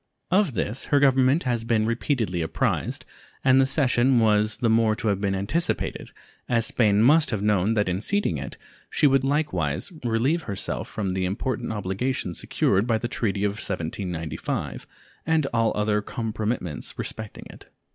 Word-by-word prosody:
Of 185 - +2
this 105 +6 -2
her 145 - +3
Government 135 +2 +4
has 120 -3 -1
been 115 -2 +1
repeatedly 115 - -1
apprised, 80 - -1 0.4
and 130 0 +5
the 135 - +3
cession 130 -2 +3
was 110 -1 +3
the 120 - 0
more 110 -1 +3
to 110 - -2
have 100 -1 0
been 100 -1 0
anticipated 100 - -2 0.4
as 115 -2 +2
Spain 105 -3 +3
must 150 +5 +5
have 105 -3 -1
known 105 +1 +2
that 105 -2 +1
in 90 +1 -1
ceding 200 - 0
it 70 - -7 0.3
she - - +1
would 135 -2 +4
likewise 115 - 0
relieve 125 +8 +1
herself 100 -1 -3
from 100 -4 -3
the 95 0 -1
important 120 +6 -2
obligation 100 0 -2
secured 100 +5 0
by 115 -2 +2
the 120 - -3
treaty 105 -4 -2
of 105 - +2
1795 85 -2 -4 0.4
and 160 -2 +1
all 115 -1 +2
other 105 0 +1
compromitments 110 - -3
respecting 110 -2 -6
it. - - -16
110 Hz, 160 wpm, -25 LUFS, 100-130 Hz, 0.4 s, and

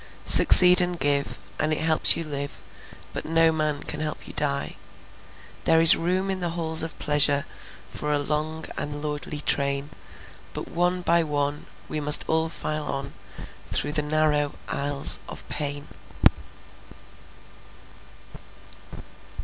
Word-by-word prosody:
Succeed 180 0 +8
and 175 0 -3
give, 140 0 0 0.2
and 155 - -1
it 155 - -1
helps 160 0 +2
you 165 - -4
live, 140 -2 -7 0.5
But - - -6
no 165 0 +1
man 155 -2 -3
can - - -3
help 155 -1 -6
you - - -11
die. 140 -1 -4 0.9
There 160 0 +3
is 165 0 +7
room 185 +3 -3
in 190 - -4
the 175 -1 -4
halls 160 -1 0
of 165 - -5
pleasure 145 -1 +2 0.4
For 150 - -6
a 145 - 0
long 155 +2 -5
and 145 0 -7
lordly 150 0 -5
train, 140 0 -1 0.6
But - - -7
one 180 +1 -2
by 170 0 +1
one 145 -1 -4 0.2
we 155 - -5
must 150 0 +6
all 160 0 -1
file 155 -2 -6
on 140 0 -6 0.6
Through 145 - -2
the 150 0 0
narrow 150 -1 -1
aisles 140 0 +4
of - - -11
pain. 145 -1 -4
150 Hz, 135 wpm, -23 LUFS, 145-160 Hz, 0.9 s, Succeed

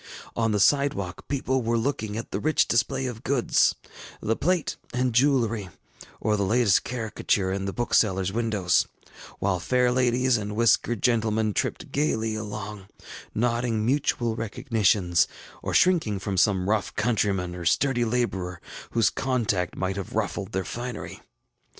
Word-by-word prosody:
On 115 -1 +1
the 105 - +1
sidewalk 100 -7 +1
people 130 -1 0
were 115 0 0
looking 110 -4 -2
at 115 - -6
the - - -2
rich 155 +1 +2
display 130 +3 +1
of 120 -3 -5
goods, 135 -3 +2 0.4
the 115 - 0
plate 180 +2 0 0.2
and 125 -1 +1
jewelry, 115 -6 +2 0.5
or 110 - +1
the 100 - -1
latest 105 0 +3
caricature 110 -5 -1
ill 95 0 -2
the 100 - -2
booksellerŌĆÖs 95 -5 +1
windows; 110 -5 +1 0.5
while 95 -2 0
fair 125 +6 +2
ladies 125 0 +2
and 105 0 -4
whiskered 115 0 +2
gentlemen 110 -3 +2
tripped - - -2
gayly 115 -7 0
along, 105 -2 -6 0.5
nodding 115 -1 0
mutual 120 -3 +1
recognitions, 110 - +1 0.3
or - - -3
shrinking 165 - +3
from 95 +1 -3
some 95 0 +2
rough 105 -1 0
countryman 100 -6 0
or 90 -1 -6
sturdy 120 - +2
laborer 95 -7 -1 0.3
whose 115 -3 +3
contact 110 -9 -1
might 95 +1 -2
have 100 - -6
ruffled 100 0 -2
their 95 -2 -2
finery. 120 -1 -6
110 Hz, 145 wpm, -26 LUFS, 100-125 Hz, 0.5 s, latest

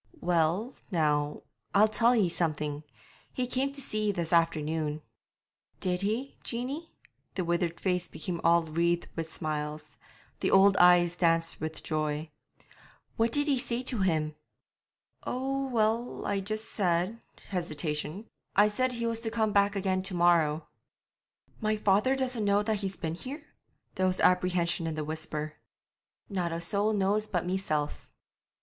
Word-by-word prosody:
'Well, 175 +8 +1 0.2
now, 150 -5 0 0.3
I'll 210 +2 +7
tell 235 +3 +3
ye 210 -6 +3
something. 150 -3 -2 0.5
He 255 - -1
came 260 +2 0
to 280 - -2
see 215 -5 +1
ye - - +3
this 175 -3 -2
afternoon.' 155 -2 +1 0.8
'Did 180 -1 0
he, 225 +7 -2
Jeanie?' 270 +8 -4 0.4
The 185 - -1
withered 170 0 0
face 180 -2 0
became 170 +1 -5
all 170 0 +5
wreathed 170 +2 0
with 165 -1 -4
smiles; 150 -1 -5 0.4
the - - +1
old 195 +1 +6
eyes 175 -1 +6
danced 165 -2 +1
with 155 0 -5
joy. 155 0 -2 0.8
'What 225 0 +2
did 290 +4 +2
ye 275 -3 +2
say 245 0 -2
to 250 -3 0
him?' 160 -5 +1 0.9
'Oh, 270 +2 -2
well, 230 0 0
I 200 -1 0
just 215 +3 -4
said' 185 +3 0 0.3
hesitation 155 +1 -3 0.3
'I 205 +1 +6
said 255 +5 0
he 235 -1 -3
was 230 -1 -1
to 230 -1 -2
come 220 -1 0
back 200 0 +3
again 190 -1 0
to 190 0 -1
morrow.' 165 -3 +3 0.9
'My 215 0 +1
father 210 +6 +3
doesn't 255 -4 -1
know 205 0 +3
that 215 -1 0
he's 195 -1 -3
been 160 -2 -3
here?' 275 - -8 0.4
There 185 0 +1
was 185 0 0
apprehension 180 -2 +2
in 160 - -2
the 155 -1 -3
whisper. 155 0 -3 0.7
'Not 180 -4 -2
a 165 - -2
soul 200 +5 +1
knows 210 +1 +1
but 175 -4 -1
meself.' 165 -5 -2
185 Hz, 150 wpm, -29 LUFS, 165-215 Hz, 0.9 s, I'll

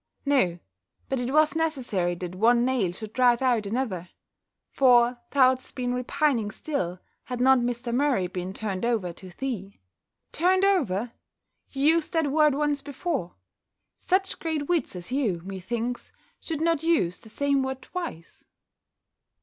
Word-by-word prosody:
"No, 255 -12 +2 0.5
but 270 - 0
it 245 0 -2
was 310 +2 +4
necessary 250 - 0
that 180 0 -6
one 235 +5 +3
nail 250 -9 +1
should 215 +4 -8
drive 250 -1 +3
out 235 -5 +2
another; 200 -7 -3 0.6
for 245 -2 +4
thou'dst 260 -2 +2
been 245 -1 -1
repining 250 -2 0
still, 185 - -3 0.3
had 250 -1 -5
not 260 +1 +5
Mr. 240 0 -2
Murray 260 -7 +2
been 180 0 -5
turned 195 -1 -4
over 220 -7 0
to 185 +2 -11
thee." 200 -2 -5 0.5
"Turned 370 +3 +3
over! 245 - +1 0.6
You 275 0 -2
used 325 +2 +3
that 320 -4 +1
word 300 -1 +4
once 295 -1 +1
before: 280 - -4 0.6
such 380 +1 0
great 315 -3 -2
wits 340 - 0
as 180 +5 -8
you, 220 -11 0
methinks, 230 +6 -4 0.3
should 315 -2 -4
not 330 -2 +2
use 310 - +1
the 220 - -14
same 280 +3 +1
word 265 0 -4
twice." 340 - -7
250 Hz, 145 wpm, -26 LUFS, 205-290 Hz, 0.6 s, not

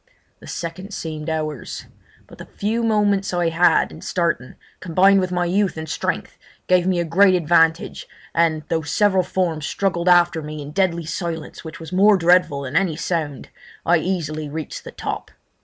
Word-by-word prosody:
The - - -14
seconds 185 +4 -6
seemed 155 -1 -5
hours; 155 -4 -4 0.4
but - - -16
the - - -9
few 220 +3 -2
moments 205 -4 +1
I 175 -1 +1
had 170 +2 +3
in - - -11
starting, 170 -8 -2 0.2
combined 190 +3 +4
with 185 -1 -1
my 180 -1 0
youth 190 +1 0
and 160 0 -5
strength, - - -3 0.3
gave 180 0 +3
me 185 -2 +1
a 170 - 0
great 185 +3 +4
advantage, 165 -1 +2 0.3
and, 160 -2 +1
though 165 -1 0
several 190 +5 +2
forms 170 -4 -2
struggled 180 -3 0
after 175 -2 +4
me 150 0 -7
in 145 0 -7
deadly 170 -1 0
silence 165 0 -5
which 160 +3 -9
was 165 +2 -9
more 200 +2 +5
dreadful 175 -5 +3
than 130 - -6
any 185 -5 +2
sound, 155 -4 -3 0.4
I 175 +1 +4
easily 155 -4 -3
reached 155 0 -6
the - - -8
top. - - -5
170 Hz, 175 wpm, -21 LUFS, 160-185 Hz, 0.4 s, more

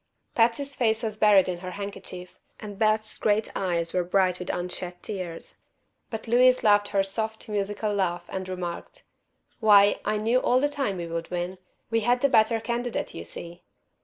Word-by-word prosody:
Patsy's 245 +4 +1
face 220 -2 +1
was 215 -1 -3
buried 205 -3 +6
in 180 -1 -3
her 185 0 -6
handkerchief, 185 -2 -7 0.2
and 205 -2 -8
Beth's 215 0 +1
great 215 +1 +1
eyes 170 -3 -1
were 180 - +1
bright 180 0 +1
with 180 - -6
unshed 180 0 -4
tears. 180 -5 -6 0.5
But 220 0 -6
Louise 250 +2 +4
laughed 205 -1 +4
her 195 -1 +1
soft, 220 +3 -3
musical 205 0 -2
laugh 175 -3 -1
and 185 -1 -5
remarked: 180 - -6 0.6
"Why, 205 -2 +6
I 215 - 0
knew 225 +4 +2
all 255 0 +3
the 290 - +2
time 275 -10 -2
we 170 - -4
would 165 0 -5
win. 180 +1 -4 0.3
We 225 - +3
had 245 +3 +1
the 280 - +4
better 225 -1 +4
candidate, 235 +1 -3
you - - -7
see." 170 +1 -8
205 Hz, 175 wpm, -26 LUFS, 180-225 Hz, 0.6 s, buried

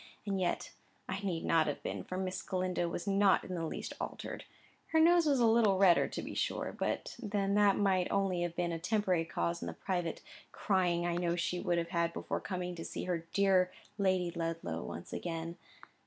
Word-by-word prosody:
And 195 -2 -1
yet 175 - -1 0.4
I 190 - -3
need 185 -5 -2
not 160 -1 +3
have 145 - -3
been, - - -3
for 185 - -5
Miss 185 0 -2
Galindo 185 -2 -1
was 170 - -4
not 200 -1 +4
in 185 - -6
the 165 -2 -2
least - - -5
altered - - -5 0.4
(her 320 - +2
nose 340 0 +6
a 270 -5 +4
little 220 -4 +4
redder, 185 -3 +5
to - - -5
be - - -6
sure, - - -1
but - - -2
then 200 -3 0
that 205 -1 +5
might 190 -3 +2
only 195 -3 +1
have 175 -1 -2
had 175 -1 0
a 165 - -3
temporary 185 -2 +1
cause 170 +1 -2
in - - -4
the - - -4
private 175 -4 -3 0.3
crying 180 -3 +1
I 175 0 0
know 175 -1 +1
she 175 +1 -1
would 175 -2 0
have 170 0 -1
had 170 -1 0
before - - -3
coming 180 -2 -3
to 165 - -5
see - - -5
her 170 -2 -2
dear 190 -2 +3 0.3
Lady 185 -3 +2
Ludlow 165 - -3
once 85 - -7
again). 165 0 -4
180 Hz, 200 wpm, -33 LUFS, 170-195 Hz, 0.4 s, nose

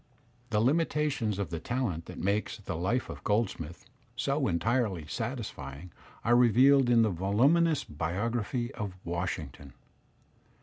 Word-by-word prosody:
The 105 -2 +1
limitations 140 - +1
of 100 -3 -3
the 85 - -3
talent 110 -8 -2
that - - -9
makes 100 +3 -1
the 100 -5 -5
"Life 100 +10 0
of - - -8
Goldsmith" 100 -6 -1 0.3
so 135 +3 0
entirely 95 -1 0
satisfying 90 - -5 0.3
are 120 +1 +5
revealed 125 +3 +5
in 115 -1 +5
the 110 - +2
volu 100 - +3
minous 170 -3 +2
biography 115 - -2
of 105 -4 -5
Washington. 85 -5 -4
110 Hz, 130 wpm, -30 LUFS, 90-125 Hz, 0.3 s, are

